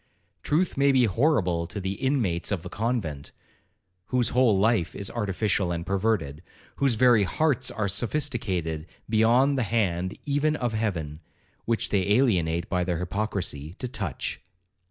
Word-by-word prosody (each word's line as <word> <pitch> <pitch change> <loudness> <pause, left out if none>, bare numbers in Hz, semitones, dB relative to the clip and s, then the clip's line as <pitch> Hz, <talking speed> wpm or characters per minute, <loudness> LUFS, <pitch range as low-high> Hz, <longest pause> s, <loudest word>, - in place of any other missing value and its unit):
Truth 165 +2 0
may 140 0 +4
be 130 -2 +4
horrible 95 - +1
to 100 - -6
the 95 0 -2
inmates 115 -10 0
of 90 -4 -2
a - - -5
convent, 105 - -3 0.8
whose 125 -2 +1
whole 120 -5 +3
life 105 -3 +1
is 100 - -4
artificial 100 -3 0
and 85 0 -3
perverted,—whose 100 - -2
very 120 -1 +5
hearts 130 - +1
are 110 -3 -2
sophisticated 100 - -1 0.2
beyond 120 +6 +3
the 115 - -1
hand 95 -5 0
even 145 +1 +1
of 120 -5 -2
Heaven 85 -9 -2 0.5
(which 115 -1 0
they 100 0 +2
alienate 85 -9 +2
by 90 -1 0
their 90 -1 -1
hypocrisy) 90 -4 -3
to 125 - -5
touch. 100 - -4
105 Hz, 140 wpm, -26 LUFS, 90-125 Hz, 0.8 s, very